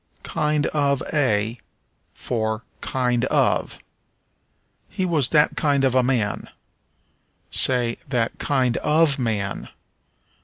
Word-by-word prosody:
Kind 150 -1 0
of 140 -3 +1
a 115 -6 +1 0.6
for 110 -1 -2 0.2
Kind 125 -2 0
of. - - +1 1.1
"He 185 - -2
was 155 -8 +2
that 150 -1 +3
kind 145 -3 +1
of 130 -2 +2
a 130 - +4
man." 120 -5 -1 1.0
Say 120 -2 +1
that 120 -4 -1
kind 130 -4 +1
of 150 -2 +2
man. 105 -5 -2
130 Hz, 105 wpm, -22 LUFS, 115-145 Hz, 1.1 s, a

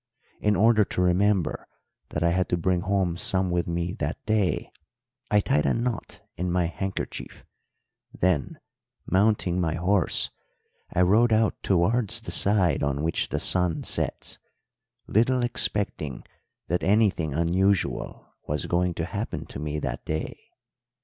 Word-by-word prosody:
In 105 0 +2
order 110 +2 +5
to 90 - -2
remember 90 -1 +1 0.4
that 75 - -2
I 85 - +3
had 90 +1 0
to 90 - +1
bring 90 +1 +1
home 95 -3 0
some 95 0 +1
with 85 -1 0
me 85 +1 -2
that 75 +4 -2
day 110 -5 0 0.6
I 105 -1 +4
tied 75 - +1
a - - +2
knot 120 0 -3
in 90 +2 -2
my 90 -1 +2
handkerchief; 95 +3 -5 0.7
then, 90 -6 0 0.5
mounting 95 -2 +2
my 80 -2 0
horse, 90 +2 +1 0.6
I 90 - +1
rode 110 +6 +4
out 110 0 +2
towards 110 +5 +2
the - - -7
side 95 -7 +2
on 70 +1 -1
which 80 - -1
the - - -1
sun 90 -3 +1
sets, - - -4 0.7
little 125 +4 +2
expecting 100 - 0 0.4
that 90 +1 0
anything 95 -8 +2
unusual 90 +3 0 0.2
was 75 +1 -1
going 90 0 0
to - - -2
happen - - -4
to - - -8
me 75 +1 -3
that 70 -4 -4
day. 80 0 -4
90 Hz, 145 wpm, -26 LUFS, 85-105 Hz, 0.7 s, order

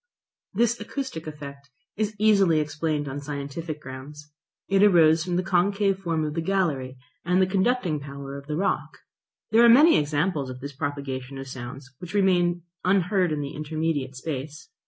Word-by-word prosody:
This 235 +2 +2
acoustic 210 - -5
effect 140 -2 -9 0.3
is 215 0 -2
easily 200 -6 +4
explained 150 0 -2
on 135 +1 -4
scientific 145 +2 -5
grounds. 150 +2 -10 0.4
It 195 0 +3
arose 165 -5 +5
from 180 0 -2
the 180 - +1
concave 195 +1 +1
form 165 -4 -1
of 150 - -3
the 165 - -2
gallery 155 -8 -1 0.3
and 180 +2 +2
the 190 - +5
conducting 190 -3 +1
power 140 -1 -8
of 140 0 -9
the 150 - -2
rock. 195 - -1 0.5
There 225 +2 +6
are 235 - +8
many 295 +8 +7
examples 150 -1 -1
of 130 0 -7
this 140 +2 -7
propagation 140 -2 -4
of 135 0 -7
sounds 130 +1 -8
which 180 +2 -8
remain 175 -3 +2 0.2
unheard 185 -1 +2
in 150 -1 -1
the 140 - -5
intermediate 155 -3 -2
space. 140 - -6
155 Hz, 165 wpm, -25 LUFS, 140-190 Hz, 0.5 s, are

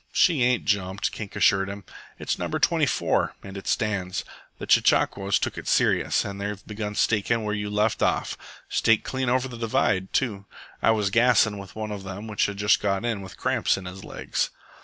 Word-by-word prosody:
"She 165 -8 +3
ain't 125 0 +2
jumped," 100 -2 0
Kink 105 -3 -7
assured 95 -1 +3
him. 100 0 -7 0.3
"It's - - -2
No. - - -2
24, - - +1
and 95 -1 -9
it 95 - -8
stands. 100 -5 -1 0.3
The - - -6
chechaquos 100 0 +3
took - - -3
it - - -10
serious, - - +2
and 100 -1 -6
they 105 +1 -2
begun 105 -1 -5
stakin' 115 +2 +1
where 105 0 -2
you 105 -1 -3
left 105 +1 0
off. - - +1 0.3
Staked 115 -1 +2
clean 130 -1 -2
over 130 +1 +1
the 120 -2 -9
divide, 105 -4 0
too. 105 -7 -1 0.4
I - - +3
was 105 -3 +2
gassin' 115 -3 +4
with 95 -2 -11
one 110 -1 -4
of 100 -1 -5
them 95 +2 -7
which 105 -1 +1
has 100 - -5
just 105 +1 +3
got 100 +2 0
in 115 -4 -1
with 95 -2 -10
cramps - - +1
in 95 - -8
his 95 +1 -8
legs." - - -2
105 Hz, 195 wpm, -25 LUFS, 100-110 Hz, 0.4 s, gassin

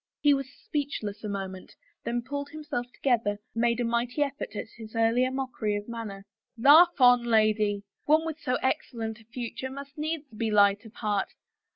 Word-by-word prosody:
He 290 -1 +5
was 275 -1 -2
speechless 260 -9 -4
a 210 - -3
moment, 190 -2 -6 0.3
then 235 +1 -1
pulling 285 +2 -5
himself 295 -5 -4
to - - -24
gether, 230 -6 +2 0.2
made 235 0 +1
a - - +1
mighty 235 +4 +1
effort 280 -6 -5
at 220 - -5
his 220 0 -10
earlier 230 +3 +3
mockery 255 -5 -2
of 205 0 -4
manner. 215 -4 -6 0.2
*' - - -53
Laugh 305 +8 +7
on, 245 -1 +7
lady.... 215 -3 +2 0.2
One 310 +2 +4
with 320 -1 -4
so 255 -3 0
excellent 230 -3 -2
a 220 - -19
future 245 +2 -5
must 280 +2 -9
needs 310 0 -2
be 225 0 -1
light 205 +1 +4
of 220 - -12
heart. 205 -3 -1
235 Hz, 185 wpm, -28 LUFS, 215-275 Hz, 0.3 s, Laugh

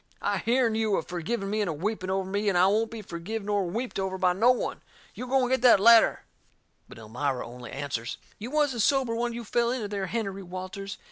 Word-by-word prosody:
I - - 0
hearn 235 -1 +2
you 220 -2 +1
a - - -1
forgiving 195 +4 -3
me 215 0 0
and 205 - 0
a - - -1
weeping 185 +4 -3
over 190 0 -1
me, 200 +2 0
and 185 - +1
I 180 - +6
won't 215 +3 +2
be 225 -2 -8
forgive 190 +5 -5
nor 200 -2 0
weeped 230 +5 -3
over 190 0 -2
by 185 -1 +2
no 220 +7 +3
one! 250 - 0 0.3
You 250 - -7
go 265 +1 +3
and 250 - -1
get 260 - +2
that 245 -5 +7
ladder." 230 +2 +6 0.7
But - - -12
Elmira 125 +4 -3
only 125 0 -10
answers: 135 -4 -4 0.2
"You 225 +4 -6
wasn't 290 -5 +1
sober 265 0 +2
when 235 +1 -1
you 235 0 -5
fell 235 +2 +1
into 240 -4 -2
there, 200 -2 -3
Hennerey 195 -3 -3
Walters. 185 +2 -7
205 Hz, 225 wpm, -27 LUFS, 185-235 Hz, 0.7 s, that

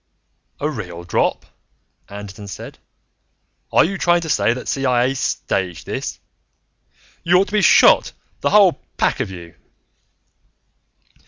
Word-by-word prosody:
"A 145 - -1
real 90 - -6
drop?" 85 - -1 0.6
Anderton 100 0 -9
said. 100 - -9 0.9
"Are - - +5
you 190 +2 -4
trying 175 0 +3
to 160 - -6
say 130 - +2
that 125 +2 -5
CIA 130 -1 +1
staged 95 -8 -3
this? - - -5 1.0
You 175 +1 +3
ought 195 +2 +2
to - - -13
be 210 - +3
shot, - - +5 0.3
the - - 0
whole 200 -5 +4 0.2
pack - - +1
of 130 -7 -2
you!" 85 -3 -10
130 Hz, 130 wpm, -19 LUFS, -, 1.0 s, Are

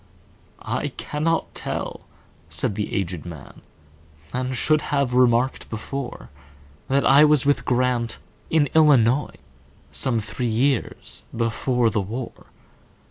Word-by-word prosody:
"I - - -2
cannot 160 +2 -1
tell," - - -4 0.5
said 85 +9 0
the 105 +1 -3
aged 90 -4 -2
man,"And 75 - -9
should 155 +4 +3
have 140 -3 +1
remarked 125 +1 +2
before, 125 - -6 0.6
That 140 +1 +2
I 140 +2 +7
was 150 -3 +4
with 145 0 +2
Grant,—in 125 +4 0
Illinois,—Some 120 - +1
three 105 +3 -3
years 125 +3 -1
before 115 +1 +1
the 105 - 0
war." 115 +6 -7
120 Hz, 100 wpm, -23 LUFS, 105-135 Hz, 0.6 s, I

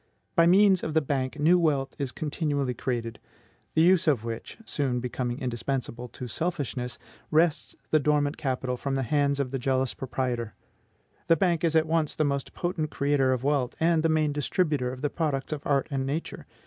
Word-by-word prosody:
By 170 -2 +5
means 190 +1 +5
of 155 - -4
the - - +6
Bank 140 -1 -2
new 170 +4 +5
wealth 145 -5 +1
is 135 -3 -2
continually 145 -4 -1
created, 115 -2 -3 0.6
the 160 - +5
use 185 0 +4
of 135 -8 +3
which 115 -1 -6
(soon 135 -9 -1
becoming 125 0 -3
indispensable 125 0 -3
to 125 +1 -8
selfishness) 135 -4 -3 0.3
wrests 160 0 +2 0.2
the 155 - +5
dormant 145 0 +1
capital 130 -4 -2
from 135 +2 -2
the 135 - 0
hands 140 +2 +1
of 130 -3 -1
the 135 - -2
jealous 130 -1 0
proprietor. 125 -3 -3 0.7
The 165 - +6
banker 170 -1 +2
is 160 - -1
at 160 0 +4
once 160 -2 0
the 155 - +1
most 140 -2 -2
potent 175 -3 -2
creator 140 -2 +1
of 130 -1 -1
wealth, 140 -3 0
and 165 0 +3
the 165 - +2
main 155 -2 +2
distributor 145 -3 0
of 130 +2 -9
the 145 - 0
products 150 -3 -1
of 150 - -5
art 140 -2 +2
and 135 -1 -1
Nature. 145 +5 -4
140 Hz, 185 wpm, -27 LUFS, 130-160 Hz, 0.7 s, the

